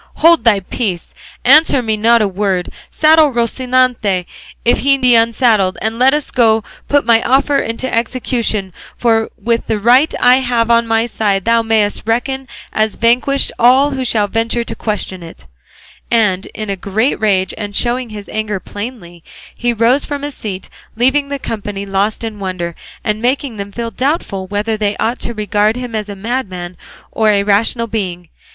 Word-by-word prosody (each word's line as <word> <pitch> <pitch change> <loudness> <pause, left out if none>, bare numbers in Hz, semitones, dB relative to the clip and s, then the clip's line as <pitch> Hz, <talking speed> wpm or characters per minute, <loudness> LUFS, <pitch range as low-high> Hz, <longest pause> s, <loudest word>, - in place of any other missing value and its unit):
Hold 330 -6 +4
thy 210 -4 +4
peace; 185 -2 -4 0.3
answer 275 -1 +5
me 220 -1 0
not 230 +1 +3
a - - +1
word; 190 -2 -2 0.2
saddle 310 0 +4
Rocinante 240 -5 0 0.4
if 240 - +3
he 275 +1 +3
be 250 -2 +3
unsaddled; 225 -4 +2
and 220 +1 -3
let 265 +3 +4
us 300 - -3
go 225 -3 +3
to - - -24 0.2
put 285 -3 +2
my 230 -1 +4
offer 275 +3 +2
into 230 +2 -3
execution; 230 -4 -1 0.2
for 225 -2 +1
with 230 +2 -1
the 220 - 0
right 250 +8 +4
that - - -5
I 250 +1 +7
have 240 -3 0
on 235 0 +3
my 225 0 +1
side 205 -4 -1
thou 230 0 +3
mayest 220 -2 +1
reckon 265 +3 -1 0.3
as 215 0 +1
vanquished 250 +4 +2
all 260 +4 +5
who 265 -1 -3
shall 220 -4 +1
venture 230 +3 -1
to - - -6
question 205 -4 -4
it;" 165 - -12 0.6
and 210 -5 +1
in 215 -2 -6
a - - -1
great 210 +7 -1
rage, 195 -3 +1
and 205 -1 -6
showing 245 +1 0
his 210 -2 -9
anger 215 -2 -3
plainly, 205 -6 -8 0.3
he 240 0 0
rose 235 +4 +2
from 285 -1 -5
his 290 0 -4
seat, 195 -6 -6 0.3
leaving 265 +5 +2
the 280 - -3
company 205 -5 -5
lost 200 +3 -1
in 220 -2 -5
wonder, 185 -3 -4 0.3
and 215 0 -2
making 255 -1 -1
them 200 0 -6
feel 230 +2 -5
doubtful 245 - -2
whether 205 +3 -2
they 210 -1 -1
ought 235 +3 -1
to 235 - -5
regard 210 +1 +1
him 250 -2 -6
as 210 -1 -3
a 200 - -6
madman 190 -5 -4 0.4
or 220 -1 +1
a 200 -1 +3
rational 215 +3 +1
being. 185 -6 -4
225 Hz, 180 wpm, -15 LUFS, 205-250 Hz, 0.6 s, I